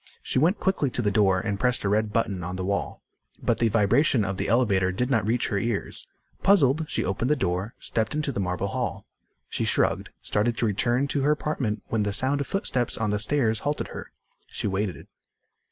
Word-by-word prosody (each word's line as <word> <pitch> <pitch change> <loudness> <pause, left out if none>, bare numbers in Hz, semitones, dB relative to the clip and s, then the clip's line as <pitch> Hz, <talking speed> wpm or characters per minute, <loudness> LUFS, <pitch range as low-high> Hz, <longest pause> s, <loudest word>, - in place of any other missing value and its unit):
She - - 0
went 175 +8 +3
quickly 190 -7 +1
to 125 - -2
the 105 - +2
door 95 -3 +3
and 100 0 -2
pressed 125 +1 +1
a - - 0
red 105 +1 +1
button 105 -5 -1
on 90 +2 -4
the 95 0 -3
wall. 100 +1 -2 0.4
But - - 0
the 115 - +3
vibration 115 +3 +3
of 95 -1 -3
the - - -2
elevator 100 -6 +2
did 125 +8 -1
not 110 -5 +2
reach 120 +2 +1
her 100 -4 0
ears. 115 -1 -3 0.3
Puzzled, 160 -5 +4
she - - -1
opened 100 +7 -1
the 150 - +4
door, 95 -2 -2
stepped 110 +5 -2
into 150 -2 -1
the 110 - -4
marble 90 +1 -1
hall. 120 -6 -3 0.4
She - - -2
shrugged, - - +1
started 115 +3 0
to 120 - +1
return 120 +6 +1
to 140 - 0
her 145 +2 +3
apartment 145 -8 -1
when 115 - 0
the 100 -1 -1
sound 135 +6 +1
of 140 - -3
footsteps 130 - -1
on 110 -2 0
the 105 - 0
stairs 115 -1 +1
halted 145 +5 -2
her. - - -8 0.4
She - - -4
waited. 100 -1 -2
115 Hz, 210 wpm, -26 LUFS, 100-130 Hz, 0.4 s, Puzzled